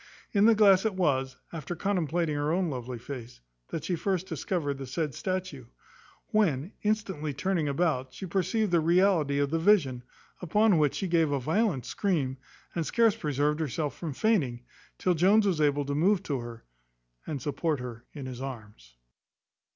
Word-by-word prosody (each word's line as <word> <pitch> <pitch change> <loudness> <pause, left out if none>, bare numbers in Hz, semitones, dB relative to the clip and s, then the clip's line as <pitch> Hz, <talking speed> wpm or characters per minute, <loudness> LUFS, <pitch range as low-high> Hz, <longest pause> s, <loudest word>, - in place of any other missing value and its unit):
In 205 0 +4
this 230 - +6
glass 195 -3 +6
it 220 -3 0
was, 135 -7 0 0.2
after 165 +2 -5
contemplating 170 -4 0
her 145 +1 0
own 175 -1 0
lovely 125 -1 -5
face, 120 - -8 0.3
that 160 - -5
she 180 - -1
first 185 +1 -1
discovered 155 -4 -2
the 135 - -6
said 150 +2 -2
statue; 185 -6 -4 0.7
when, 175 -6 +1
instantly 190 -9 -1
turning 175 0 0
about, 140 -3 0
she 190 - -7
perceived 190 +3 0
the 170 - +4
reality 170 -3 +3
of 140 0 +1
the 165 - +1
vision: 160 -10 +3 0.4
upon 200 +1 +3
which 145 -2 +2
she 195 - -2
gave 165 -3 +2
a 140 - +1
violent 160 - 0
scream, 150 -10 -1 0.4
and 170 - -1
scarce 225 +7 +3
preserved 150 +1 0
herself 150 -1 -2
from 165 -3 -5
fainting, 135 - +1 0.3
till 180 - +1
Jones 195 +6 +4
was 180 -6 +1
able 145 -1 +2
to 140 - -2
move 185 +6 +2
to 140 -6 -2
her, 120 -1 -8 0.6
and 150 -3 -3
support 145 +2 -1
her 120 -2 -7
in 140 -4 -8
his 130 -1 -7
arms. 105 - -9
155 Hz, 170 wpm, -28 LUFS, 135-185 Hz, 0.7 s, this